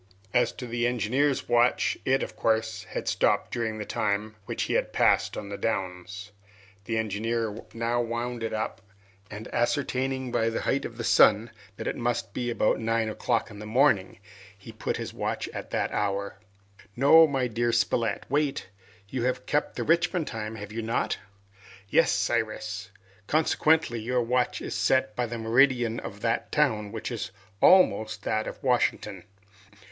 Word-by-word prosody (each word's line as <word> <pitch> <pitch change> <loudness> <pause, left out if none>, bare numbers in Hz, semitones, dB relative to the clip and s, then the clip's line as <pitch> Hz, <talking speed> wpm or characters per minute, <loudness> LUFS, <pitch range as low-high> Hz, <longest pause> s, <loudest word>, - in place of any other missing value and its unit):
As 120 -1 +3
to 125 - -7
the 120 0 0
engineer's 125 +4 0
watch, 120 +1 +3
it, 135 +1 +2
of - - -7
course, 110 0 0
had - - -5
stopped - - +1
during 115 -2 -2
the 105 - -5
time 105 +1 -1
which - - -2
he - - -2
had - - 0
passed - - +2
on 100 - -6
the 100 0 -6
downs. 95 -1 -3 0.5
The 115 +1 -1
engineer 110 +1 -2
now 115 +1 0
wound 120 +1 -3
it 115 - -2
up, 110 +1 -3 0.5
and 105 +1 -8
ascertaining 130 0 0
by 115 -1 +1
the 115 - -3
height 140 - 0
of 115 - -7
the 115 - -4
sun 110 0 +5 0.3
that - - -6
it - - -1
must 120 -4 -2
be 120 -1 -2
about 115 - +1
nine 115 0 0
o'clock 115 +1 -1
in 105 - -10
the 105 - -7
morning, 110 -5 +2 0.4
he 100 +3 -11
put 110 - -3
his - - -5
watch - - -3
at - - -7
that - - -1
hour. 100 -1 -2 0.6
"No, 160 +5 +7
my 135 -3 0
dear 120 0 0
Spilett, 115 0 0
wait. 145 -6 -1 0.4
You 125 +3 -2
have 125 0 -1
kept 150 - 0
the - - -2
Richmond 170 0 +2
time, 110 -3 -5
have 105 -1 -8
you 115 +1 -4
not?" 115 +2 -1 0.7
"Yes, - - +4
Cyrus." 110 0 -1 0.4
"Consequently, 155 -3 +2
your 125 +2 0
watch 125 +1 0
is - - -4
set 120 -5 +1
by 120 -1 -1
the 120 +1 -5
meridian 120 0 +3
of 100 +1 -8
that 115 0 -1
town, 110 -9 +1
which 110 +3 -5
is 115 - -4 0.3
almost 110 - +4
that 110 +1 -1
of - - -8
Washington?" 105 -7 0
115 Hz, 170 wpm, -27 LUFS, 110-125 Hz, 0.7 s, No